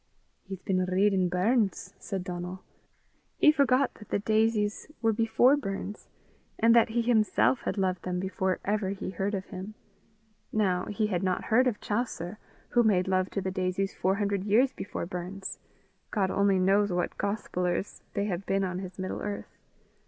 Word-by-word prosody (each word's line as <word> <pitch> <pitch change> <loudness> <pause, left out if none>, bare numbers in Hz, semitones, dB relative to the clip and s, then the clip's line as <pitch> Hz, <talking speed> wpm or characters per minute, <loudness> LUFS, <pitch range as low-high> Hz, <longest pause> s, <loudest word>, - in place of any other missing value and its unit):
"He's 190 -2 -8
been 185 -1 +1
readin' 185 0 +2
Burns!" 200 +4 +1
said 190 -2 -4
Donal. 180 +1 -6 0.7
He 305 - +7
forgot 275 -3 +3
that 210 - -14
the - - +1
daisies 215 0 +1
were 225 -1 +2
before 230 +5 +4
Burns, 205 -5 -5 0.5
and 230 +1 +5
that 235 - +5
he 235 +1 0
himself 230 +2 +3
had - - -1
loved 185 -2 0
them 180 -1 -2
before 190 0 -1
ever 205 -1 0
he 195 -1 -4
heard 195 +3 -1
of 190 -1 -4
him. 195 +1 -7 0.8
Now, 185 -4 +1
he 215 +1 -1
had 185 -4 -1
not 185 -2 0
heard 250 +3 +3
of 225 -4 -1
Chaucer, 210 -3 -3 0.3
who 240 - +4
made 195 -5 +3
love 185 0 +1
to 195 - -2
the 190 - -2
daisies 185 +1 -1
four 190 +2 +1
hundred 200 -2 -1
years 240 +6 +3
before 195 - -5
Burns. 180 +2 -6 0.5
God 195 -4 0
only 200 -1 +3
knows 195 +2 +3
what 175 0 -2
gospellers 180 -3 -2
they 200 - 0
have 195 -1 -3
been 195 0 +1
on 180 -1 -2
his 185 -1 -8
middle 185 -1 -4
earth. 205 -1 -5
195 Hz, 170 wpm, -28 LUFS, 185-215 Hz, 0.8 s, He